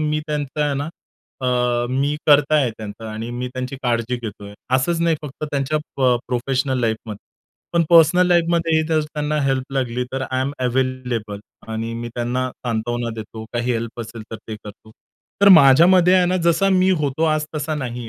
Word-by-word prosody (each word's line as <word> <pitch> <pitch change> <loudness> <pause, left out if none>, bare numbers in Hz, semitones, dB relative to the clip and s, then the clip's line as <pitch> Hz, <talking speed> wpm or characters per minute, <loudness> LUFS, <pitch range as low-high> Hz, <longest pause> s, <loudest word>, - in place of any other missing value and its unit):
मी 155 0 0
त्यांचं 150 -1 -3
आहे 145 -1 0
ना 145 +2 -3 0.5
अ, 125 -1 +1
मी 140 +3 0
कर्ता 150 0 +5
आहे 130 -5 +2
त्यांचा 110 0 -8
आणि 115 +2 -5
मी 125 +1 -4
त्यांची 130 +1 -4
काळजी 120 0 0
घेतो 105 -4 -8
आहे. 100 0 -10 0.2
असंच 165 +6 +1
नाही 165 -2 +2
फक्त 150 +1 -6
त्यांच्या 140 +2 0 0.2
प 130 -2 +3
प्रोफेशनल 130 +1 -1
लाईफमध्ये. 110 -2 -3 0.5
पण 170 -1 +3
पर्सनल 170 +2 +6
लाईफमध्ये 170 -2 +2
ही 160 - +3
जर 160 -1 +2
त्यांना 150 0 -2
हेल्प 135 0 -1
लागली 125 -2 -1
तर 135 0 -2
आय 130 0 0
एम 140 +2 -1
अवेलेबल. 125 -5 -2 0.3
आणि 115 +1 -4
मी 120 0 -5
त्यांना 125 +2 -1
सांत्वना 120 0 -3
देतो. 110 0 -8
काही 120 +1 -1
हेल्प 115 +1 -4
असेल 115 -1 -8
तर 110 - -5
ते 110 - -4
करतो. 105 +1 -12 0.5
तर 200 - +8
माझ्यामध्ये 170 +6 +6
आहे 180 -1 +4
ना? 185 +1 +1
जसा 170 +4 +3
मी 185 0 +3
होतो 145 +3 0
आज 155 0 -1
तसा 155 +1 -2
नाही 120 -4 -5
130 Hz, 185 wpm, -21 LUFS, 120-150 Hz, 0.5 s, तर